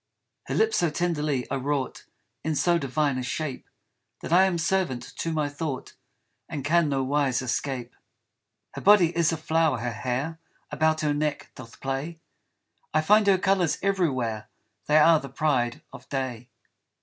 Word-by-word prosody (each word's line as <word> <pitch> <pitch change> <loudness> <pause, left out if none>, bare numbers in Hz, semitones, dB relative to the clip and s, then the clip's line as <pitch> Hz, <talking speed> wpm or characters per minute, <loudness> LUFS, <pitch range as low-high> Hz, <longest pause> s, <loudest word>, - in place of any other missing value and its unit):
Her - - -2
lips 445 0 +2
so 170 - +2
tenderly 150 -5 -1
are 135 - 0
wrought 140 0 -3 0.4
In 160 0 -1
so 170 +3 +2
divine 140 -1 0
a - - -2
shape, 135 +2 -4 0.5
That - - -3
I 185 +2 +7
am 185 -3 0
servant 165 -7 0
to 165 - -2
my 155 -2 0
thought 145 -2 -5 0.6
And 140 -3 -5
can 165 0 +3
no 135 -1 0
wise 135 -2 +1
escape. 125 0 -3 0.8
Her - - -7
body 190 -5 +5
is 170 -1 +3
a 165 - -2
flower, 160 -2 +1
her 120 +1 -3
hair 130 +8 -3 0.3
About 155 0 +1
her 150 -1 +1
neck 150 0 -2
doth 115 -2 -12
play; 135 +5 -4 0.8
I 155 - +4
find 210 +5 +4
her 195 -1 +5
colours 185 -5 +1
everywhere, 130 - 0 0.4
They 150 - +4
are 160 +1 +6
the 140 - -8
pride 130 -4 0
of - - -12
day. 125 -3 -4
150 Hz, 160 wpm, -26 LUFS, 130-165 Hz, 0.8 s, I